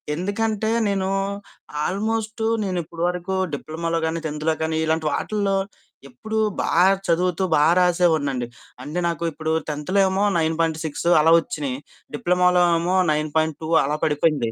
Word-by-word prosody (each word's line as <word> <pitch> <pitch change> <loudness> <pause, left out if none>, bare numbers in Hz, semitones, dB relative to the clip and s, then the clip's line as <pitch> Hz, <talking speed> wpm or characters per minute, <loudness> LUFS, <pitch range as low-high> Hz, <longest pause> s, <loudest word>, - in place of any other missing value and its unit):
ఎందుకంటే 215 +4 -1 0.2
నేను 195 -1 0 0.8
ఆల్మోస్ట్ 220 +3 -2 0.2
నేను 185 -2 -2
ఇప్పటి 170 +1 -6
వరకు 180 +1 -3 0.2
డిప్లొమాలో 165 +3 -3
కాని, 160 +1 -2
10థ్‌లో 150 0 -4 0.2
కానీ 160 0 -1
ఇలాంటి 160 -1 0
వాటిల్లో 200 +5 -1 0.5
ఎప్పుడూ 220 - -4 0.2
బా - - -1 0.4
చదువుతూ, 180 +2 +1
బా 150 - +4 0.2
రాసేవాడినండి. 160 -8 +1 0.4
అంటే 155 +6 -4
నాకు 170 0 -3
ఇప్పుడు 160 +1 -3 0.2
10థ్‌లో 150 +4 -5 0.2
ఏమో 190 +2 0
9.6 160 -1 -1
అలా 165 +2 +5
వచ్చినాయి, 145 -5 -4 0.4
డిప్లొమాలో 180 +2 +3 0.2
ఏమో 180 +2 0 0.2
9.2 155 +1 -1 0.2
అలా 150 +2 -1
పడిపోయింది. 145 -6 +1
165 Hz, 125 wpm, -22 LUFS, 155-185 Hz, 0.8 s, అలా